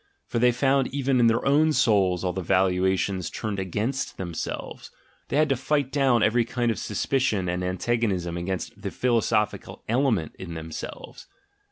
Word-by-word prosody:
For 120 Hz, -, -2 dB
they 125 Hz, +1 st, +5 dB
found 135 Hz, +2 st, +2 dB
even 135 Hz, -1 st, 0 dB
in 120 Hz, -, +5 dB
their 115 Hz, 0 st, +1 dB
own 150 Hz, +3 st, +4 dB
souls 95 Hz, -, +2 dB
all 90 Hz, -1 st, -1 dB
the 95 Hz, -, -3 dB
valuations 95 Hz, 0 st, +1 dB
turned 105 Hz, -3 st, -4 dB
against 105 Hz, +8 st, -2 dB
them 90 Hz, -3 st, -5 dB
selves; -, -, -5 dB, 0.4 s
they -, -, -1 dB
had 155 Hz, 0 st, +3 dB
to 135 Hz, -, +3 dB
fight 140 Hz, +1 st, 0 dB
down 135 Hz, -5 st, +3 dB
every 120 Hz, +2 st, +3 dB
kind 120 Hz, 0 st, -1 dB
of -, -, -4 dB
suspicion 105 Hz, -3 st, 0 dB
and 90 Hz, +1 st, -2 dB
antagonism 95 Hz, -2 st, -1 dB
against 95 Hz, +3 st, -4 dB
"the 100 Hz, -, -3 dB
philosophic 115 Hz, -2 st, +1 dB, 0.2 s
element 115 Hz, -, +1 dB
in 85 Hz, -3 st, -7 dB
them 80 Hz, 0 st, -7 dB
selves." -, -, -8 dB
110 Hz, 170 wpm, -25 LUFS, 95-125 Hz, 0.4 s, they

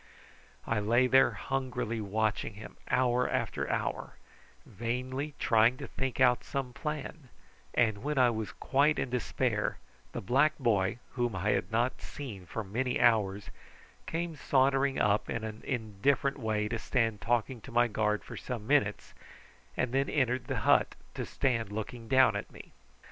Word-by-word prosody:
I 115 Hz, -, 0 dB
lay 115 Hz, +5 st, +3 dB
there 130 Hz, +1 st, +5 dB
hungrily 125 Hz, -4 st, -2 dB
watching 110 Hz, +1 st, -1 dB
him 105 Hz, -, -10 dB
hour 125 Hz, 0 st, +2 dB
after -, -, -2 dB
hour, -, -, -2 dB, 0.5 s
vainly 130 Hz, +7 st, -4 dB
trying 115 Hz, +2 st, +4 dB
to -, -, -6 dB
think 130 Hz, -1 st, -4 dB
out 125 Hz, -2 st, +4 dB
some 135 Hz, -3 st, -4 dB
plan, 150 Hz, -1 st, -5 dB, 0.5 s
and 110 Hz, -4 st, +2 dB
when 150 Hz, +1 st, -2 dB
I 125 Hz, -2 st, +5 dB
was 110 Hz, -2 st, -4 dB
quite 145 Hz, +3 st, +2 dB
in 130 Hz, -, -2 dB
despair 125 Hz, -2 st, -1 dB, 0.3 s
the -, -, -4 dB
black 140 Hz, +9 st, +2 dB
boy, 110 Hz, -7 st, +1 dB
whom 120 Hz, -4 st, -1 dB
I 95 Hz, +3 st, -1 dB
had -, -, -1 dB
not 120 Hz, +3 st, 0 dB
seen 105 Hz, -11 st, -8 dB
for 115 Hz, -, -4 dB
many 125 Hz, +6 st, -1 dB
hours, 105 Hz, -4 st, +2 dB, 0.6 s
came 165 Hz, 0 st, -3 dB
sauntering 135 Hz, 0 st, +2 dB
up 105 Hz, 0 st, +2 dB
in 115 Hz, -, -2 dB
an 110 Hz, 0 st, -6 dB
indifferent 130 Hz, +5 st, 0 dB
way 110 Hz, -3 st, 0 dB
to 115 Hz, 0 st, -2 dB
stand 115 Hz, -5 st, 0 dB
talking 120 Hz, +1 st, 0 dB
to 130 Hz, -, -11 dB
my 120 Hz, +1 st, +4 dB
guard 105 Hz, -1 st, 0 dB
for -, -, -9 dB
some 120 Hz, -4 st, -5 dB
minutes, 110 Hz, -6 st, +1 dB, 0.6 s
and 130 Hz, -2 st, 0 dB
then 135 Hz, +1 st, +1 dB
entered 130 Hz, -3 st, 0 dB
the -, -, -2 dB
hut -, -, +3 dB, 0.2 s
to -, -, -4 dB
stand 115 Hz, -6 st, 0 dB
looking 110 Hz, +2 st, -5 dB
down 130 Hz, +2 st, +5 dB
at -, -, -5 dB
me. -, -, -12 dB
120 Hz, 160 wpm, -30 LUFS, 110-130 Hz, 0.6 s, there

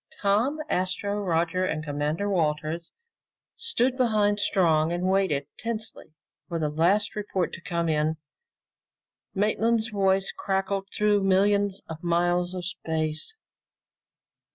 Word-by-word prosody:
Tom, 215 Hz, +9 st, +2 dB
Astro, 195 Hz, 0 st, -1 dB
Roger, 175 Hz, -1 st, 0 dB
and 155 Hz, -4 st, -1 dB
Commander 150 Hz, +5 st, -2 dB
Walters 165 Hz, -2 st, -1 dB, 0.6 s
stood 365 Hz, -, +1 dB
behind 210 Hz, -4 st, +2 dB
Strong 165 Hz, -6 st, +2 dB
and 175 Hz, +1 st, -2 dB
waited 190 Hz, -7 st, +1 dB
tensely 220 Hz, -8 st, -5 dB, 0.3 s
for 170 Hz, -, -3 dB
the 155 Hz, -2 st, 0 dB
last 180 Hz, +9 st, +2 dB
report 200 Hz, -4 st, -2 dB
to -, -, -7 dB
come 170 Hz, -2 st, -2 dB
in. 155 Hz, 0 st, +1 dB, 1.2 s
Maintland's 220 Hz, +3 st, +1 dB
voice 195 Hz, -2 st, +1 dB
crackled 195 Hz, 0 st, -1 dB
through 210 Hz, -1 st, +2 dB
millions 200 Hz, +1 st, +2 dB
of 160 Hz, +1 st, -8 dB
miles 175 Hz, +1 st, +1 dB
of 180 Hz, -1 st, -4 dB
space. 160 Hz, -, -2 dB
190 Hz, 115 wpm, -26 LUFS, 165-205 Hz, 1.2 s, Tom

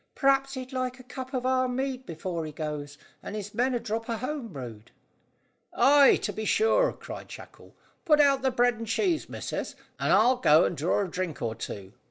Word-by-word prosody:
"P'r'aps 275 Hz, 0 st, +2 dB
he'd 260 Hz, 0 st, -7 dB
like 255 Hz, 0 st, -2 dB
a 255 Hz, -, -13 dB
mug 260 Hz, +1 st, -5 dB
of 255 Hz, 0 st, -2 dB
our 255 Hz, 0 st, +2 dB
mead 260 Hz, 0 st, -3 dB
before 170 Hz, 0 st, -4 dB
he 155 Hz, -, -6 dB
goes, 150 Hz, -1 st, -5 dB, 0.2 s
and 205 Hz, -, -7 dB
his 210 Hz, -1 st, -6 dB
men 250 Hz, +1 st, +1 dB
a -, -, 0 dB
drop 225 Hz, +1 st, -4 dB
of 230 Hz, -1 st, -2 dB
home 265 Hz, -1 st, -3 dB
brewed." 120 Hz, -, -9 dB, 0.9 s
"Ay, 285 Hz, 0 st, +6 dB
to 205 Hz, -, -2 dB
be 220 Hz, -, -4 dB
sure," 455 Hz, -, +3 dB
cried -, -, -9 dB
Shackle. -, -, -13 dB, 0.3 s
"Put 305 Hz, -4 st, +4 dB
out 280 Hz, -2 st, +4 dB
the 265 Hz, -, +2 dB
bread 245 Hz, -2 st, +2 dB
and 230 Hz, -, -5 dB
cheese, 335 Hz, -, 0 dB
missus, -, -, -5 dB, 0.2 s
and -, -, +1 dB
I'll 240 Hz, +6 st, +5 dB
go 160 Hz, -10 st, +5 dB
and -, -, -1 dB
draw 165 Hz, +6 st, +1 dB
a -, -, -6 dB
drink 180 Hz, -2 st, -4 dB
or 115 Hz, -1 st, -1 dB
two. 100 Hz, -3 st, -7 dB
245 Hz, 205 wpm, -27 LUFS, 170-265 Hz, 0.9 s, Ay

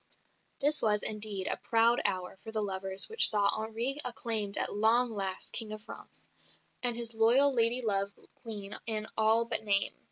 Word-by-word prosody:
This 295 Hz, +2 st, +3 dB
was, 210 Hz, -2 st, +1 dB
indeed, 210 Hz, -3 st, -2 dB
a -, -, -1 dB
proud 230 Hz, +1 st, +2 dB
hour 185 Hz, 0 st, -3 dB
for 220 Hz, -, -11 dB
the 215 Hz, -1 st, -2 dB
lovers 190 Hz, -1 st, +1 dB
which 450 Hz, +1 st, +4 dB
saw 205 Hz, -2 st, +1 dB
Henri 230 Hz, +6 st, 0 dB
acclaimed 220 Hz, -4 st, -2 dB
at -, -, +2 dB
"long 230 Hz, +4 st, +1 dB
last" 195 Hz, -3 st, -4 dB
King 225 Hz, -3 st, -2 dB
of 215 Hz, 0 st, -7 dB
France, -, -, -13 dB, 0.5 s
and 245 Hz, -2 st, +1 dB
his 235 Hz, -1 st, -3 dB
loyal 245 Hz, +6 st, +4 dB
lady 240 Hz, +1 st, +1 dB
love 200 Hz, -2 st, 0 dB, 0.2 s
Queen 210 Hz, -3 st, -6 dB
in 215 Hz, -1 st, -2 dB
all 220 Hz, +1 st, +2 dB
but 230 Hz, -, 0 dB
name. 200 Hz, -2 st, +2 dB
220 Hz, 170 wpm, -29 LUFS, 205-235 Hz, 0.5 s, which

